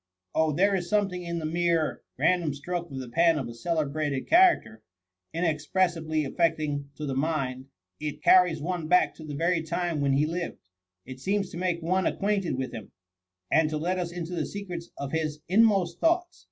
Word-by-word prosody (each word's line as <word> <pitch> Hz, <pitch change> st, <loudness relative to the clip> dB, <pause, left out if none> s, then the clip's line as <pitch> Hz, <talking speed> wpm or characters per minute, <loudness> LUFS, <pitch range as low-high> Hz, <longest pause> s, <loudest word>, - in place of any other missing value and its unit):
^ -, -, -62 dB, 0.3 s
Oh, 160 Hz, -1 st, +2 dB
there 195 Hz, +7 st, +3 dB
is 175 Hz, -3 st, -1 dB
something 195 Hz, -4 st, +1 dB
in 170 Hz, -1 st, -4 dB
the 160 Hz, -, -3 dB
mere 165 Hz, -1 st, 0 dB, 0.2 s
random 170 Hz, -6 st, +2 dB
stroke 175 Hz, +4 st, -4 dB
of 135 Hz, -, -7 dB
the 130 Hz, -1 st, -5 dB
pen 165 Hz, +3 st, +3 dB
of 135 Hz, -5 st, -3 dB
a 120 Hz, -, -7 dB
celebrated 145 Hz, 0 st, -2 dB
cha 335 Hz, -, +5 dB, 0.2 s
racter, 110 Hz, 0 st, -13 dB, 0.5 s
inexpressibly 160 Hz, -1 st, 0 dB
affecting 150 Hz, -2 st, 0 dB
to 150 Hz, -, -5 dB
the 135 Hz, -, -2 dB
mind; 135 Hz, -3 st, -2 dB, 0.2 s
— -, -, -57 dB
it 150 Hz, -1 st, -5 dB
carries 180 Hz, -4 st, +5 dB
one 170 Hz, +1 st, -3 dB
back 180 Hz, +2 st, +4 dB
to 160 Hz, -, -12 dB
the 150 Hz, -2 st, -6 dB
very 170 Hz, +3 st, +1 dB
time 170 Hz, -1 st, -2 dB
when 140 Hz, -1 st, +2 dB
he 140 Hz, +3 st, +3 dB
lived 170 Hz, +2 st, -3 dB, 0.3 s
— 90 Hz, 0 st, -58 dB
it 130 Hz, 0 st, -9 dB
seems 195 Hz, +5 st, -1 dB
to -, -, -7 dB
make 175 Hz, -2 st, -1 dB
one 185 Hz, +3 st, +1 dB
acquainted 200 Hz, -7 st, 0 dB
with 130 Hz, 0 st, -3 dB
him, 110 Hz, -, -8 dB, 0.6 s
and 160 Hz, -1 st, +4 dB
to 155 Hz, -, -2 dB
let 180 Hz, +4 st, -1 dB
us 175 Hz, -1 st, -3 dB
into 175 Hz, 0 st, -5 dB
the 175 Hz, -, -2 dB
secrets 180 Hz, -4 st, -6 dB
of 140 Hz, -1 st, -5 dB
his 155 Hz, -2 st, -2 dB
inmost 195 Hz, -4 st, +3 dB
thoughts. 345 Hz, +2 st, +1 dB
165 Hz, 200 wpm, -27 LUFS, 150-180 Hz, 0.6 s, cha